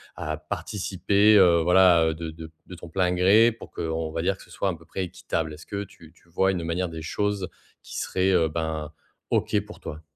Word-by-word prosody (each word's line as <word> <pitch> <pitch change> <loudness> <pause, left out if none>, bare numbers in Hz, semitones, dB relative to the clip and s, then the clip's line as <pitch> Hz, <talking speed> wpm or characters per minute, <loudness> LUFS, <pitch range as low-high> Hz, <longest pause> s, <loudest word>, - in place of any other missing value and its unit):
à 75 0 -4
participer, 100 +5 +1
heu, 85 -4 +6
voilà, 90 -1 +5
heu, 80 - +1
de 80 0 -6
de 80 0 -10 0.2
de 90 - -9
ton 85 0 -11
plein 90 +1 +1
gré 100 +6 +5
pour 115 - -12
qu'on 80 0 -3
va 80 - -2
dire 95 +2 +1
que - - -14
ce - - -20
soit 100 - -1
à - - -1
peu 80 0 -17
près 95 +3 -4
équitable? 85 -3 -4
Est-ce 75 +1 -12
que 100 0 -3
tu 85 -4 -16
tu 85 - -27
vois 95 +3 +2
une 90 -3 -3
manière 85 +2 -2
des 80 -1 -7
choses 100 +2 -2 0.3
qui - - -8
serait, 95 +1 0
heu, 85 -3 +3
ben, 80 -1 -3 0.4
OK - - +2
pour - - -12
toi? 75 - -7
85 Hz, 225 wpm, -25 LUFS, 80-95 Hz, 0.4 s, heu